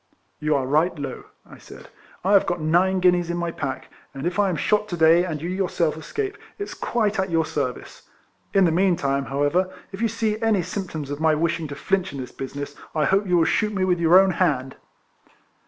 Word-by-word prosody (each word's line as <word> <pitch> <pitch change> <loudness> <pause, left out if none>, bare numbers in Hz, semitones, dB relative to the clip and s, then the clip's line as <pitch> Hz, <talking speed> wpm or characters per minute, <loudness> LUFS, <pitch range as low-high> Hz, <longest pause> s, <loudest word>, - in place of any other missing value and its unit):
" - - -44
You 150 0 +1
are 135 -2 0
right, 155 +6 +1
Low," 140 -1 -6 0.2
I - - -14
said. - - -13 0.2
" - - -27
I 195 - +3
have 200 - +5
got 175 0 -1
nine 180 +4 +2
guineas 180 -1 +3
in 175 - -2
my 170 -1 -2
pack, 130 -4 -5 0.2
and 135 +3 -5
if 175 +3 -1
I 200 -1 +3
am 180 - -1
shot 210 +5 +1
to 175 - -3
day, 165 +2 +5
and 160 -4 -3
you 165 - -5
yourself 180 -4 0
escape, 395 - -4 0.2
it 405 0 -4
's - - -8
quite 220 -3 -1
at 190 0 0
your 165 -1 +1
service. 145 -5 -5 0.4
In 195 -2 +4
the 165 - +3
meantime, 165 -6 +1
however, 145 +8 0 0.2
if 195 +2 -7
you 230 - +3
see 220 -1 -2
any 220 -5 +2
symptoms 160 -7 -5
of 145 - -4
my 160 -1 +3
wishing 165 0 -1
to 145 - -7
flinch 190 +4 -1
in 140 - -6
this 125 -2 -6
business 145 +2 -6 0.2
I 155 -1 +2
hope 195 +1 +2
you 180 -1 +3
will 165 - +4
shoot 210 +3 0
me 190 - 0
with 180 -2 +1
your 170 +2 +6
own 195 0 +4
hand." 140 -8 0
170 Hz, 230 wpm, -23 LUFS, 150-190 Hz, 0.4 s, your